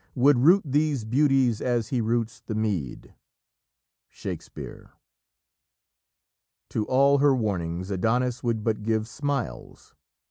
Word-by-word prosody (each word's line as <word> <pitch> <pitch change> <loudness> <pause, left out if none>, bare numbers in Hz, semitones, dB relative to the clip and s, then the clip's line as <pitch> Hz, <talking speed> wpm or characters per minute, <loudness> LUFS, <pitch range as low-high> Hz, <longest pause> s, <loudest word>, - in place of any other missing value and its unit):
Would 135 +1 +4
root 175 +9 +5
these 145 -3 0
beauties 130 -2 +2
as 120 -3 -1
he 125 -3 0
roots 115 0 -1
the 110 - -5
mead." 100 - -3 1.0
Shakespeare. - - -8 1.8
To 105 - -2
all 140 +2 +4
her 140 -1 +4
warnings, 95 -5 -3
Adonis 120 +6 0
would 115 -3 -1
but 110 -1 -1
give 110 0 -1
smiles. 140 0 -5
120 Hz, 110 wpm, -25 LUFS, 110-135 Hz, 1.8 s, root